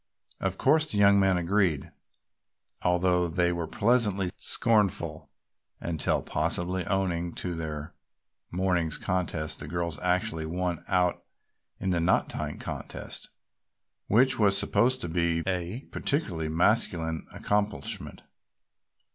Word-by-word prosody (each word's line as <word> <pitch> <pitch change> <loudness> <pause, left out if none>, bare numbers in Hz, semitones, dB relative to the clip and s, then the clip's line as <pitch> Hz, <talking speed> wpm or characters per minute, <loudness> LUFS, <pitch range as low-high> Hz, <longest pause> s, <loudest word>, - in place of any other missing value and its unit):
Of 95 -1 -1
course 155 +3 +3
the 105 - -1
young 100 0 +6
men 95 -2 +3
agreed, 90 -4 +1 0.9
although 90 0 +2
they 85 +1 +1
were 85 -2 -2
pleasantly 100 -2 +2
scornful, 105 -5 0 0.5
until 80 -3 -1
possibly 85 +4 -1
owing 85 -3 -1
to 90 - -3
their 80 -2 -5 0.6
morning's 90 -3 0
contest 85 -4 -2
the - - -6
girls 85 -1 -3
actually 90 -3 0
won 90 0 -2
out 90 -2 +1 0.6
in 95 - -1
the 85 - +1
knot 85 +3 +2
tying - - -4
contest, - - -6 0.8
which 130 +5 +4
was 100 -2 +4
supposed 130 +2 +2
to - - -3
be 85 0 0
a 95 +5 -2
peculiarly 95 - 0
masculine 80 -2 +1
accomplishment. 105 0 -2
90 Hz, 115 wpm, -28 LUFS, 85-100 Hz, 0.9 s, young